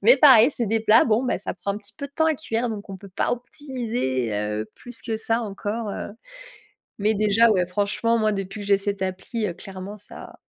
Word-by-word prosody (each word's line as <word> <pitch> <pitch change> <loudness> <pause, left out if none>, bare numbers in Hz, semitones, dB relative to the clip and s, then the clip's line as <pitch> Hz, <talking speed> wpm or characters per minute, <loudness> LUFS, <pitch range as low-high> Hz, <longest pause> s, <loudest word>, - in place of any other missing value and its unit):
Mais 240 +6 +7
pareil, 260 -3 +8
c'est 235 - -1
des 225 +2 +1
plats, 220 +1 +6
bon, 230 +2 +2
bah, 250 - 0
ça - - -4
prend 200 +2 -3
un 205 - -5
petit 205 0 -4
peu 280 - -4
de - - -37
temps 320 +1 +2
à 315 - +3
cuire 240 -4 -2
donc 210 -2 -6
on 190 - -6
peut 200 - -12
pas - - +1
optimiser, 240 - -2
heu, 105 +1 -2
plus 245 -1 -8
que 225 -2 -2
ça 225 +1 0
encore, 210 +1 -4
heu. - - -5 0.9
Mais 215 +2 +2
déjà, 215 +2 +4
ouais 180 -3 +2
franchement, 205 +5 +1
moi, 215 -1 +2
depuis 195 +1 -4
que - - -7
j'ai 200 -1 +5
cette 200 0 -3
appli, 190 +4 -3
clairement, 195 +1 -8
ça 210 - -9
215 Hz, 225 wpm, -24 LUFS, 195-235 Hz, 0.9 s, pareil